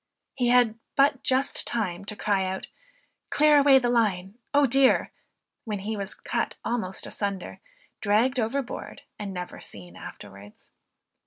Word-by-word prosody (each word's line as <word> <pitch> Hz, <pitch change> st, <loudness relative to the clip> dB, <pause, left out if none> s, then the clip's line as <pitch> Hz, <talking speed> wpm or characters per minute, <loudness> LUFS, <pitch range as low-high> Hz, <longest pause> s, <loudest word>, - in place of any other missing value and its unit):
He 250 Hz, -2 st, 0 dB
had 240 Hz, -2 st, +4 dB, 0.2 s
but 275 Hz, -1 st, +3 dB
just 265 Hz, +1 st, +2 dB
time 200 Hz, -5 st, -2 dB
to 210 Hz, -, -4 dB
cry 200 Hz, -2 st, 0 dB
out, 190 Hz, 0 st, -4 dB, 0.6 s
"clear 300 Hz, 0 st, +5 dB
away 280 Hz, -1 st, +7 dB
the 245 Hz, -2 st, +1 dB
line," 205 Hz, -3 st, 0 dB
"O 285 Hz, 0 st, +4 dB
dear!" 265 Hz, +1 st, +4 dB, 0.5 s
when 215 Hz, -2 st, -3 dB
he 210 Hz, +3 st, -4 dB
was 200 Hz, -1 st, -5 dB, 0.5 s
almost 220 Hz, -6 st, -2 dB
cut -, -, -5 dB
assunder, 200 Hz, -3 st, -4 dB, 0.4 s
dragged 225 Hz, +5 st, +2 dB
overboard 245 Hz, +3 st, -3 dB, 0.2 s
and 205 Hz, -2 st, -5 dB
never 180 Hz, -1 st, -7 dB
seen 90 Hz, -3 st, -8 dB
afterwards. 100 Hz, +2 st, -12 dB
220 Hz, 140 wpm, -26 LUFS, 190-255 Hz, 0.6 s, away